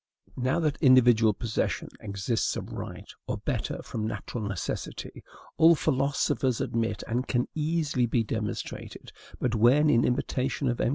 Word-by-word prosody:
Now, 130 +6 0
that 155 -2 -1
individual 120 -5 +6
possession 110 +2 -2
exists 105 +2 -1
of - - -6
right, - - -7 0.2
or, - - -2
better, - - -3
from 110 -1 -4
natural 115 0 -5
necessity, 100 -4 -5 0.3
all 165 +1 +7
philosophers 135 -3 +1
admit, 115 0 -1
and 125 +3 -1
can 125 -1 0
easily 150 -6 0
e 120 - +2
demonstrated; 105 -2 -5 0.3
but 125 - 0
when, 130 +7 +5
in 115 - +4
imitation 130 +1 0
of 120 - -1
M. - - +2
125 Hz, 145 wpm, -28 LUFS, 115-140 Hz, 0.3 s, all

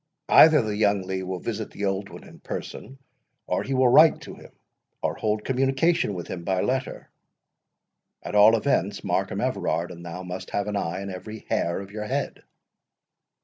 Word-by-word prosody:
Either 155 -4 +7
the 105 -1 -3
young 100 -2 +2
Lee 95 0 -3
will 95 0 -4
visit 110 +3 -4
the 100 - -5
old 95 0 -2
one - - -11
in - - -15
person, 135 - -7 0.5
or - - -1
he 135 - -3
will 130 0 +4
write 155 +6 +6
to - - -9
him, - - -14 0.5
or - - 0
hold 105 0 -2
communication 135 - +1
with 85 - -5
him 85 - -6
by 95 +1 0
letter. 130 +6 -3 1.1
At - - -6
all 105 +2 +7
events, - - 0
Markham - - -1
Everard 85 +2 -1
and 85 -1 -10
thou 85 +2 -7
must 90 +1 -7
have 100 - -1
an 105 -1 -3
eye 90 -1 -2
in 100 0 -6
every 110 +4 -9
hair 85 +1 0
of 100 0 -11
your 105 0 -5
head." - - -3
105 Hz, 185 wpm, -25 LUFS, 95-120 Hz, 1.1 s, Either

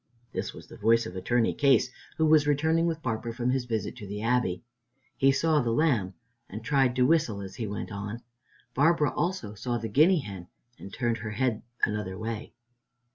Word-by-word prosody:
This - - -3
was - - -12
the - - -13
voice 115 +2 +3
of 90 - -7
Attorney 115 +5 +1
Case, 140 -2 +3 0.3
who 160 - +3
was 155 -1 +5
returning 160 +3 +2
with 160 -1 -3
Barbara 115 -1 -2
from 125 +1 0
his 130 -1 0
visit 110 -1 -3
to 105 -5 -8
the 100 +1 -5
Abbey. 115 -6 +1 0.5
He 135 0 +4
saw 150 +2 +2
the 120 - -1
lamb 115 - +1 0.3
and 110 +3 -7
tried 135 -1 +2
to 125 0 +3
whistle 150 -9 +2
as 95 -1 -8
he 115 - -3
went 105 +2 -5
on. 105 +3 -5 0.5
Barbara 150 +1 +3
also 170 - -2
saw 120 +3 -2
the 115 -1 -4
guinea 155 - +5
hen 95 -7 -8 0.3
and 100 - -9
turned 120 0 -1
her 110 -1 -5
head 110 +1 0 0.2
another 105 -3 0
way. 110 +1 -5
120 Hz, 190 wpm, -28 LUFS, 105-145 Hz, 0.5 s, was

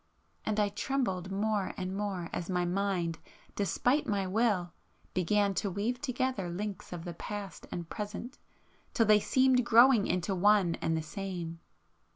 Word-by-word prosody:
——and 215 0 -1
I 205 -1 +3
trembled 200 -5 -2
more 205 0 0
and 185 +1 -3
more 195 -4 -3
as 175 - -3
my 180 -1 +1
mind, 180 -3 -1 0.4
despite 245 +8 +1
my 200 -2 0
will, 190 -4 +1 0.4
began 200 +3 +2
to 200 - -1
weave 220 +7 -2
together 255 -8 -1
links 200 +3 -5
of 175 -1 -6
the 175 - -5
past 200 +1 -7
and 170 -2 -4
present, 210 +8 -6 0.6
till 230 - +4
they 210 0 +6
seemed 260 +3 +3
growing 235 -1 +6
into 180 +2 0
one 195 -2 +4
and 160 0 +1
the 160 - -2
same. 170 0 -5
200 Hz, 155 wpm, -31 LUFS, 180-215 Hz, 0.6 s, they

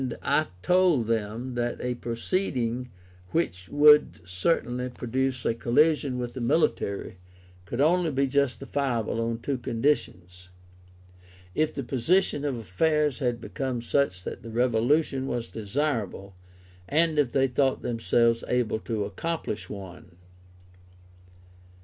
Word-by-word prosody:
I 155 - +2 0.2
told 180 -9 +3
them 115 +3 -2
that 120 0 -2
a 125 0 -2
proceeding 125 -1 -2 0.4
which 90 - -2
would 150 +1 +6
certainly 125 - 0
produce 125 +1 -2
a - - +2
collision 135 +3 +2
with 120 -1 -4
the 130 - -6
military, 120 - 0 0.5
could 120 - -4
only 170 +3 +3
be 140 -1 +1
justifiable 135 -4 -1
on 115 0 -2
two 135 0 -2
conditions: 115 -8 -2 1.0
if 155 0 +1
the 140 - -5
position 145 +6 +1
of 140 -3 -1
affairs 150 - +1
had 120 -4 0
become 130 -3 -3
such 120 -8 0
that - - -7
a 115 - -8
revolution 125 +4 +1
was 120 -3 -3
desirable, 110 -4 -3 0.6
and 160 0 +2
if 135 -5 +2
they 135 +1 +3
thought 135 +1 +1
themselves 115 0 +1
able 120 -3 0
to 110 -2 -2
accomplish 105 - -4
one. 90 -3 -10
125 Hz, 120 wpm, -27 LUFS, 115-145 Hz, 1.0 s, would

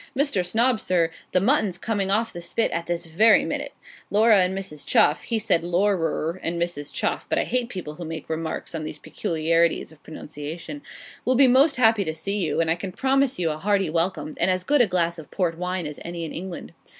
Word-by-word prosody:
Mr. 280 -10 +2
Snob, 225 +6 +2
sir, 170 -4 +1 0.2
the 185 - +3
mutton's 205 -4 +2
coming 200 -1 -1
off 220 +3 0
the 175 - -7
spit 225 +6 -1
at 170 0 -3
this 170 0 -2
very 205 +7 +4
minute. - - -3 0.4
Laura 215 0 +5
and 185 +1 0
Mrs. 155 -7 -6
Chuff' 150 - +3
(he 230 - -2
said 205 -6 +1
LAURAR 175 -2 0
and 170 +1 -2
Mrs. 170 -4 -3
Chuff; - - -2
but - - +1
I - - +2
hate 250 -1 -1
people 180 -8 -6
who 170 - -8
make 160 -1 -6
remarks 160 +1 -4
on 160 -1 -4
these 155 - -6
peculiarities 165 +2 0
of 160 - -19
pronunciation,) 160 - -8 0.4
'will 255 - +2
be 270 +1 +6
most 275 +4 +5
happy 225 -4 +4
to 160 -3 -3
see 195 +6 -2
you; 175 - 0
and 165 -1 +2
I - - +3
can 185 +1 -5
promise 270 +5 +1
you 170 -3 0
a 150 - -4
hearty 195 -2 +1
welcome, 165 -2 -1
and - - +2
as 185 0 0
good 290 +3 +3
a 240 - +4
glass 170 -2 0
of 155 - -11
port 175 -4 -1
wine 180 0 -3
as 150 -1 -6
any 170 -1 -5
in 160 - -6
England.' 175 -1 -7
180 Hz, 220 wpm, -24 LUFS, 165-215 Hz, 0.4 s, be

